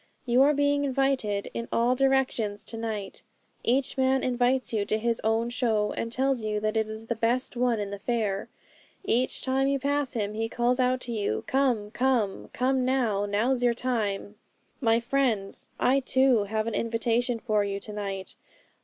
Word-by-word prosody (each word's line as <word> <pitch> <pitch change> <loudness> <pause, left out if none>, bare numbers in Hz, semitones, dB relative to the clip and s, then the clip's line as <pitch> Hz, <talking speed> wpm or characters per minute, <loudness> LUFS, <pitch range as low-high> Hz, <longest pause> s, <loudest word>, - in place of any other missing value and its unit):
You 245 +1 +4
are 290 +2 +5
being 285 0 +2
invited 265 -7 0
in 235 0 -4
all 235 +2 +3
directions 255 -6 +1
to - - -6
night. 220 -3 -5 0.4
Each 260 +2 0
man 265 0 +2
invites 250 0 +1
you 210 -2 +1
to 215 - 0
his 230 +1 -1
own 225 +2 +1
show, 225 -4 0
and 230 - -4
tells 265 0 0
you 215 -1 -1
that 215 +1 -1
it 220 -1 0
is 220 +1 -7
the 235 - -1
best 235 +3 0
one 240 -2 +1
in 200 -1 -3
the 200 - -5
fair. 210 -3 -1 0.6
Each 250 -3 0
time 265 +1 +1
you 275 0 +2
pass 285 0 -1
him, 210 -3 -2
he 225 +1 -2
calls 245 +2 +1
out 255 0 +2
to 240 - -6
you, 205 - -1
"Come! 245 -6 +1
come! 240 -5 0
Come 260 +1 +1
now! 235 -6 +1
Now's 235 +6 +1
your 240 -1 +3
time!" 215 -5 -2 0.5
'My 230 -3 +3
friends, 235 -5 -1
I 265 +2 +3
too 260 -4 +3
have 215 +1 -1
an 230 - -3
invitation 230 +2 0
for 215 -3 0
you 200 0 -3
to 210 - -7
night. 195 -2 -5
235 Hz, 180 wpm, -27 LUFS, 215-260 Hz, 0.6 s, are